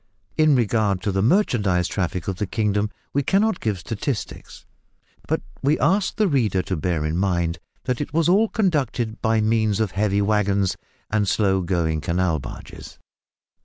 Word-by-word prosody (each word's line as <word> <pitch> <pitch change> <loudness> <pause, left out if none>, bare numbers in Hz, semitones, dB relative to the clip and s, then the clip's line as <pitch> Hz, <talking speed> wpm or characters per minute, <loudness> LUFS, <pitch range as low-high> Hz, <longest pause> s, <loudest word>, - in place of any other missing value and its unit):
In 155 -2 +4
regard 110 -5 +1
to 100 - 0
the 95 0 0
merchandise 105 - +2
traffic 90 -2 -3
of 95 -2 -2
the 105 - -2
kingdom, 105 -1 0 0.2
we 140 - +2
cannot 195 +7 +1
give 105 -3 -1
statistics, 110 - -5 0.6
but - - -1 0.2
we 145 +3 +2
ask 190 +2 +1
the 215 -1 +2
reader 110 - +1
to 95 - -2
bear 80 -1 -1
in 80 +2 -1
mind 85 -3 0 0.2
that 125 0 -2
it 145 - -4
was 165 +1 +2
all 205 +5 +4
conducted 135 - -1
by 110 -1 +2
means 110 -1 +1
of 110 -4 0
heavy 100 0 +1
waggons 100 -2 +1 0.4
and 105 -2 +1
slow 95 -1 +2
going 85 -3 0
canal 85 -1 0
barges. 65 - -10
105 Hz, 165 wpm, -23 LUFS, 95-130 Hz, 0.6 s, In